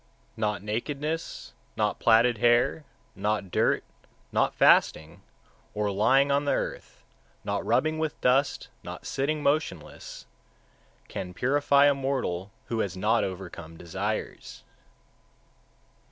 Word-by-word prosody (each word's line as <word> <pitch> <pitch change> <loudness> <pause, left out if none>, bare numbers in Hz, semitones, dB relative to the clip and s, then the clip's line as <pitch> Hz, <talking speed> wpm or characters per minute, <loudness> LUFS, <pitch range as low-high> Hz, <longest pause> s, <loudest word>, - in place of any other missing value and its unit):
141. 105 -1 0
Not 105 -1 -8
nakedness, 145 +9 -4 0.2
not - - 0
platted 115 0 +4
hair, 120 +6 +3 0.3
not 105 -1 -2
dirt, - - +2 0.5
not - - +1
fasting, 80 +1 +3 0.5
or 105 -1 0
lying 130 +8 +3
on 140 +1 +2
the 145 - +2
earth, - - -5 0.4
not - - -2
rubbing 155 0 +1
with 160 -1 -2
dust, 135 +3 +1
not - - -9
sitting 145 +2 -1
motionless, 140 - -2 0.8
can 90 -1 -6
purify 140 +2 +3
a 145 - +5
mortal 130 -10 -2 0.2
who 115 - -3
has 95 -4 -2
not 105 +4 +2
overcome 85 -3 -7
desires. 95 +6 -5
115 Hz, 115 wpm, -27 LUFS, 100-140 Hz, 0.8 s, a